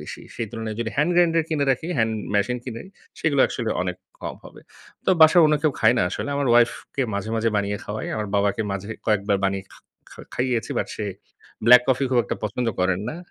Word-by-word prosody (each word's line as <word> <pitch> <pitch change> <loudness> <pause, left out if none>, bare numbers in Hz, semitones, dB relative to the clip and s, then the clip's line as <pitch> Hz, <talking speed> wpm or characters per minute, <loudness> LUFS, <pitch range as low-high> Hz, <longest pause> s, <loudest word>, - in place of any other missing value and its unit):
বেশি। - - -9
সেই 115 - -3
তুলনায় 110 -1 -5
যদি 115 -1 -2
হ্যান্ড 150 +4 +2
গ্রাইন্ডার 165 -2 +4
কিনে 150 -3 0
রাখি 135 +6 -1
হ্যান্ড 110 0 +2 0.2
মেশিন 125 +5 +1
কিনি 115 -3 -6 0.4
সেগুলো 145 -4 +2
একচুয়ালি 115 -3 -3
অনেক 90 0 -3 0.3
কম - - -4
হবে। - - -13 0.4
তো - - +2
বাসায় 160 +2 +8
অন্য 150 - +3
কেউ 155 -3 +2
খায় - - +5
না, - - +3
আসলে - - -4
আমার 140 -1 0
ওয়াইফ 120 0 +6 0.2
কে 135 - 0
মাঝে, 100 +2 -3
মাঝে 115 +1 +1
বানিয়ে 100 0 -1
খাওয়াই। 105 +1 -5
আমার 105 -2 -3
বাবাকে 100 +2 +1
মাঝে 100 +2 -5 0.2
কয়েকবার 100 -2 +1
বানিয়ে 95 0 -2
খা - - -16 0.3
খা - - -12
খাইয়েছি। 125 -3 -1
বাট - - -1
সে 105 - -3 0.6
ব্লাক 125 0 +9
কফি 130 +1 +2
খুব 125 - +3
একটা - - -3
পছন্দ 115 +4 -2
করেন 95 0 +1
না 160 - -5
115 Hz, 210 wpm, -23 LUFS, 105-135 Hz, 0.6 s, ব্লাক